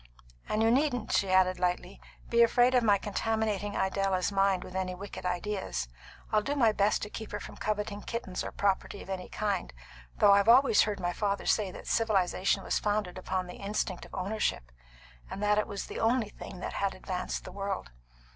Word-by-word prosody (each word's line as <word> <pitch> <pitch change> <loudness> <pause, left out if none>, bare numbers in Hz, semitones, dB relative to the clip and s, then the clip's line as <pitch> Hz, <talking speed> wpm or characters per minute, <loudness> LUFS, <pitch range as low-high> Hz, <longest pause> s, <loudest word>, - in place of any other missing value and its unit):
And 215 +1 +1
you 225 - +4
needn't," 250 -3 +1
she 195 - +2
added 185 -1 +3
lightly, 180 +1 -2 0.3
"be 235 0 +3
afraid 245 +2 +5
of 250 - +5
my 205 -3 +5
contaminating 210 0 -1
Idella's 190 0 +1
mind 195 -2 +2
with 185 - -10
any 185 -1 -2
wicked 195 -1 -6
ideas. 180 - -2 0.4
I'll 215 - +4
do 280 +6 -2
my 235 -6 +4
best 210 0 +1
to 210 - -4
keep 220 - -7
her - - -3
from - - -9
coveting 210 -1 -2
kittens 220 -6 -4
or - - -5
property 200 0 -1
of 195 - -8
any 185 -1 -5
kind; 200 -4 -2 0.5
though 205 - +6
I've 200 +2 +5
always 250 -2 +7
heard 210 -2 0
my 175 -1 -1
father 200 0 -1
say 210 -3 +2
that - - -10
civilisation 195 -3 +1
was - - 0
founded 205 -3 -1
upon 185 0 -2
the 180 - -9
instinct 200 -2 -2
of - - -11
ownership, 190 - -2 0.6
and 200 - -5
that 210 0 +3
it 210 - -1
was 200 -2 -5
the - - -6
only 225 -1 +2
thing 185 -3 -10
that - - -4
had 195 -1 -1
advanced 185 -1 -4
the - - -9
world. 195 - -4
200 Hz, 195 wpm, -30 LUFS, 185-215 Hz, 0.6 s, always